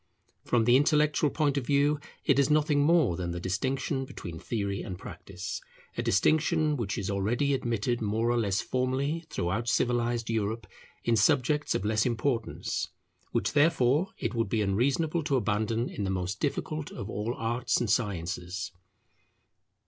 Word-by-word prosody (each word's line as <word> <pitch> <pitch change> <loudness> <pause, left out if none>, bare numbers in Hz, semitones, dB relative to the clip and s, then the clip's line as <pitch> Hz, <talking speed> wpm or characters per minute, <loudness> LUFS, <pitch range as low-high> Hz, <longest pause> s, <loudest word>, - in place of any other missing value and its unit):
From 115 -2 +2
the 120 +2 +6
intellectual 150 +1 +3
point 145 -2 +1
of 125 - -8
view 145 +1 +3 0.3
it - - +4
is 140 0 +3
nothing 150 -1 +3
more 150 - +4
than 85 0 -3
the 85 0 -3
distinction 130 - -1
between 85 -10 -8
theory 100 -2 -2
and 90 - -6
practice; - - -7 0.3
a - - -1
distinction 155 - +2
which 105 -6 -2
is 100 0 -2
already 115 +9 +1
admitted 120 -2 -1
more 110 +2 +1
or 120 - +1
less 100 -4 +1
formally 135 +6 -1
throughout 110 +1 -1
civilized 120 0 +1
Europe 110 0 -1 0.4
in 115 - +2
subjects 130 +7 +2
of 95 - -1
less 110 +1 +2
importance; 120 -1 -1 0.4
which - - 0
therefore 145 +1 +3
it - - -2
would 115 -3 0
be 110 0 +1
unreasonable 140 - +1
to 145 -2 0
abandon 110 +1 0
in 105 - -5
the 95 - -1
most 95 +2 -2
difficult 155 +1 -2
of 100 - -7
all 110 +4 -3
arts 120 +2 0
and 115 -5 0
sciences. 95 -2 -2
120 Hz, 155 wpm, -29 LUFS, 105-140 Hz, 0.4 s, the